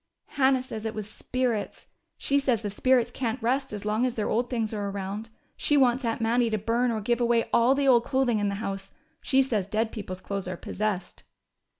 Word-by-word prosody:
"Hannah 265 -2 +2
says 225 -3 -5
it 220 - -5
was 215 -2 -4
'spirits.' 240 0 -2 0.3
She 280 0 +1
says 250 -5 +1
the 205 - -2
spirits 245 +2 +2
can't 245 -1 -2
rest 260 +4 0
as 210 -1 -6
long 215 +3 +1
as 250 -1 0
their 215 - -1
old 240 +2 +1
things 225 -3 -1
are 205 -1 -2
around. 200 +3 -5 0.3
She 295 - +2
wants 255 -1 +3
Aunt 230 -1 -1
Mattie 235 +1 +2
to 215 - 0
burn 230 +4 +1
or 220 -2 -1
give 240 +3 0
away 235 -1 +2
all 245 +3 +5
the 280 0 +1
old 240 -3 +6
clothing 260 -5 +1
in 205 -1 +1
the 200 - -2
house. 195 -2 -5 0.3
She 270 -1 +3
says 215 -8 -1
dead 220 +2 0
people's 190 -4 -6
clothes 195 -1 -4
are 180 -1 -4
possessed." 200 -2 -3
230 Hz, 215 wpm, -27 LUFS, 210-250 Hz, 0.3 s, old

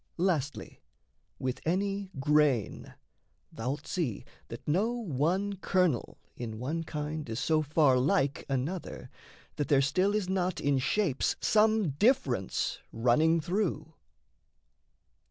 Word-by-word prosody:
Lastly, 165 -6 -2 0.6
with 130 -1 -3
any 195 +3 -1
grain, 145 -6 +1 0.6
Thou'lt 130 +6 -4
see 150 - -3 0.2
that - - -9
no 200 +10 +1
one 195 - -1
kernel 180 -8 0 0.2
in 110 -3 -6
one 150 +8 -3
kind 150 -2 -5
Is 110 +1 -3
so 155 +1 +2
far 145 -3 +3
like 140 0 +1
another, 140 +7 -3 0.5
that 145 - -1
there 140 - +4
still 185 +9 +2
Is 210 -3 0
not 185 -1 -1
in 140 -1 +1
shapes 155 +1 0
some 215 -3 +3
difference 140 - +1
running 155 +9 +3
through. 165 -3 -2
155 Hz, 115 wpm, -30 LUFS, 135-190 Hz, 0.6 s, there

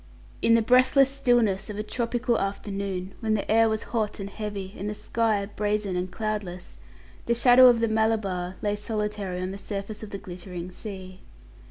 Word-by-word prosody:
In 230 - +5
the 230 - +3
breathless 255 +3 +5
stillness 240 -8 +2
of 205 - -5
a 210 - -2
tropical 235 +1 -1
afternoon, 195 -1 -3
when 220 -1 0
the 205 - -2
air 225 0 +5
was 220 0 -1
hot 215 -3 -1
and 200 0 -5
heavy, 205 -2 -5
and 200 +2 -4
the 210 - -4
sky 220 -2 0
brazen 205 -1 -1
and 180 +1 -2
cloudless, 200 -2 -5 0.5
the 235 - +2
shadow 245 +1 +7
of 240 -2 +5
the 230 - +3
Malabar 215 -5 0
lay 205 0 +1
solitary 210 -3 -3
on 185 +1 -3
the 195 - -7
surface 200 +1 -5
of 215 - -7
the 200 - -5
glittering 180 -1 -7
sea. 185 -1 -8
210 Hz, 180 wpm, -26 LUFS, 195-225 Hz, 0.5 s, shadow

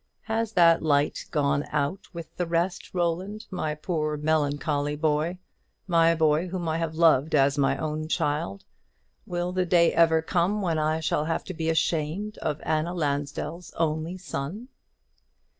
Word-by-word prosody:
Has 225 0 -2
that 170 -3 +5
last 160 - -3
light 145 -1 +1
gone 145 -1 +1
out 150 +6 -2
with 170 -2 -9
the 175 - -2
rest, 170 +2 -1
Roland, 185 +5 -2
my 155 -5 -2
poor 155 -1 -2
melancholy 145 -1 0
boy, 155 +3 0 0.5
my 165 -2 +4
boy 160 +2 +2
whom 180 -1 -4
I 160 +1 0
have 165 -1 -2
loved 160 -3 +4
as 140 0 +4
my 140 -2 +2
own 155 0 -3
child? 145 - -1 0.6
will 175 0 -2
the 180 0 0
day 170 -1 +4
ever 160 -1 +4
come 180 +5 +1
when 170 -5 0
I 155 +1 0
shall 150 0 0
have 165 +1 -1
to 185 - -7
be 160 -1 -2
ashamed 165 +5 -1
of 150 -1 -2
Anna 160 +3 0
Lansdell's 150 +2 -3
only 160 +3 -1
son?" 175 - -5
160 Hz, 160 wpm, -26 LUFS, 150-175 Hz, 0.6 s, that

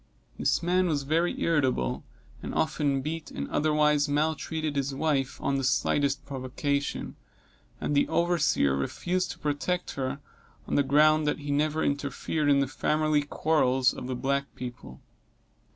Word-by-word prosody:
This - - +1
man 180 +1 +2
was 145 -4 0
very 165 +5 0
irritable, 130 - +1 0.4
and - - -6
often 145 -3 0
beat 155 +1 -4
and 70 - -5
otherwise 150 -1 +2
maltreated 155 +1 -1
his 140 -1 -1
wife, 140 -3 0
on 140 0 0
the - - -3
slightest 135 +2 +1
provocation, 140 +1 -3 0.6
and - - -2
the 140 - +3
overseer 170 - +2
refused 180 - -1
to - - -6
protect 150 +5 -2
her, 135 +1 -3 0.5
on - - -4
the - - +4
ground, 150 +2 +4
that 150 - +1
he 145 -1 -5
never 155 +2 +1
interfered 145 +1 -1
in 140 -1 +4
the 140 - +1
family 155 +2 +1
quarrels 135 -4 +2
of - - -7
the 130 - -2
black 140 +2 0
people. 120 - -8
145 Hz, 150 wpm, -28 LUFS, 135-155 Hz, 0.6 s, the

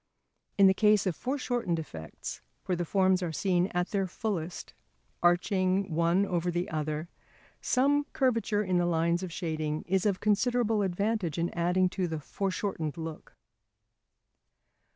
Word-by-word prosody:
In 200 - +7
the 190 - +7
case 210 0 +4
of 185 -4 0
foreshortened 245 -9 -1
effects, 80 - -7 0.2
where 180 - 0
the 175 0 -2
forms 190 +1 +2
are 175 -2 -2
seen 180 +1 +1
at 180 -1 -2
their 195 -2 0
fullest, 180 -4 -4 0.5
arching 185 +1 +2
one 170 +4 +3
over 175 -2 -1
the 175 +1 -2
other, 155 +1 -2 0.5
some 285 +3 +2
curvature 230 -5 +1
in 185 -2 +1
the 175 - +1
lines 170 +1 +1
of 185 -2 -5
shading 155 -3 -3
is 190 +2 +1
of 195 -2 0
considerable 220 +1 +2
advantage 195 -2 -1
in 170 +1 0
adding 180 +2 +2
to 185 -1 -2
the 160 -2 -3
foreshortened 185 -2 -3
look. 160 -1 -7
185 Hz, 145 wpm, -29 LUFS, 170-205 Hz, 0.5 s, In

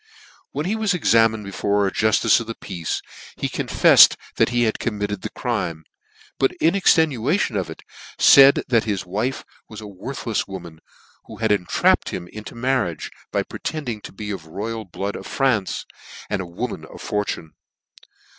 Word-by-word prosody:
When 145 +3 -4
he 200 +4 0
was 215 -4 0
examined 115 -8 +3
before 100 +1 0
a 95 - -1
jultice 110 +1 +3
of 115 -1 -7
peace, 85 -2 -4 0.3
he - - -1
confeflcd - - +6 0.2
that - - +3
he 120 0 +1
had 110 -2 0
committed 105 -3 -3
the - - -4
crime; 80 -2 -3 0.6
but, 135 - +2
in 165 -2 +2
extenuation 160 - +2
of 95 -4 -2
it, 80 - -10 0.3
faid 140 0 +7
that 115 -3 +2
his 100 -4 -2
wife 105 +9 -2 0.2
was 110 - -9
a - - -10
worthlefs 105 +3 -4
woman, 85 -5 -9 0.5
who - - -10
had 110 -2 0
entrapped 100 -4 +2
him 90 -1 -6
into 105 +1 -9
marriage, 120 - -1 0.2
by - - 0
pretending 125 -9 -5
to - - -9
be 105 +1 -6
of 95 - -5
(he 80 - -18
blood 80 - -16 0.4
royal 100 +3 -4
of - - -10
France, 125 -8 0 0.5
and - - 0
a 90 - -7
woman 90 0 -5
of - - -13
fortune. 105 -7 -3
110 Hz, 165 wpm, -22 LUFS, 95-130 Hz, 0.6 s, faid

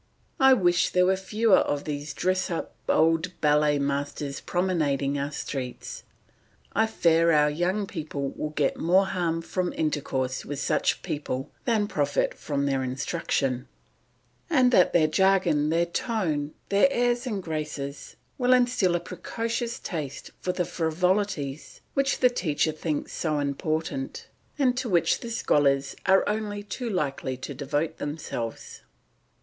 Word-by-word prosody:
I 265 -1 +7
wish 175 -5 +3
there 180 0 +3
were 190 +1 +3
fewer 210 +2 +3
of 145 0 -1
these 145 0 -4
dressed 185 +1 0
up 170 - -4 0.2
old 165 +3 +2
ballet 150 0 +3
masters 140 0 -2
promenading 145 -6 0
our 140 +1 -2
streets. 130 -3 -5 0.7
I 220 - +3
fear 170 -5 +3
our 150 -1 +4
young 180 +6 0
people 150 -6 -4
will 150 - -4
get 150 -2 0
more 185 +4 +3
harm 170 -3 -1
from 180 +1 -2
intercourse 135 -4 -1
with 145 - -5
such - - 0
people 140 -1 -4
than 220 -3 +2
profit 145 -6 0
from 140 -2 -2
their 135 -1 +1
instruction, 130 -1 -1 0.8
and 255 -6 +4
that 180 - +5
their 165 -3 +4
jargon, 170 -3 +3
their 170 +2 +2
tone, 170 - -2
their 200 +6 +5
airs 245 0 +1
and 205 -5 -3
graces, 150 -3 -5 0.2
will 250 0 +4
instil 245 -8 +3
a - - +1
precocious 230 +7 -4
taste 150 -6 -5
for 180 - -1
the 180 -1 -1
frivolities 165 -3 -1
which 275 0 +1
the 250 - +6
teacher 160 -7 0
thinks 155 -1 -3
so 155 -2 -1
important, 160 - -3 0.3
and 260 -4 +3
to 255 -2 -2
which 175 -4 +3
the 235 - -7
scholars 140 -10 +2
are 190 0 +5
only 210 -1 -2
too 230 +4 -4
likely 140 - -2
to 130 - -6
devote 145 +3 -2
themselves. 145 -6 -5
165 Hz, 145 wpm, -26 LUFS, 145-195 Hz, 0.8 s, I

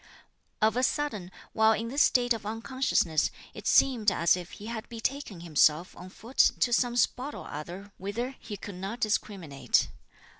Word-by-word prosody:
Of 220 0 +4
a 250 - +1
sudden, 250 -10 -1 0.2
while 220 0 +5
in 230 +1 -3
this 280 +4 +1
state 245 -1 +4
of 225 - -6
unconsciousness, 225 - 0 0.2
it - - -7
seemed 230 -6 +4
as 170 -1 +3
if 175 -1 -8
he 205 - -10
had 225 -1 -6
betaken 230 -4 -4
himself 160 0 +2
on 180 - -10
foot 230 +7 -12 0.2
to 240 - +3
some 245 0 +2
spot 255 +3 0
or - - -8
other 175 +7 -7
whither 235 +7 -4
he 210 -2 -7
could 200 +1 -8
not 195 +6 -6
discriminate. 190 -9 0
220 Hz, 165 wpm, -28 LUFS, 185-245 Hz, 0.2 s, while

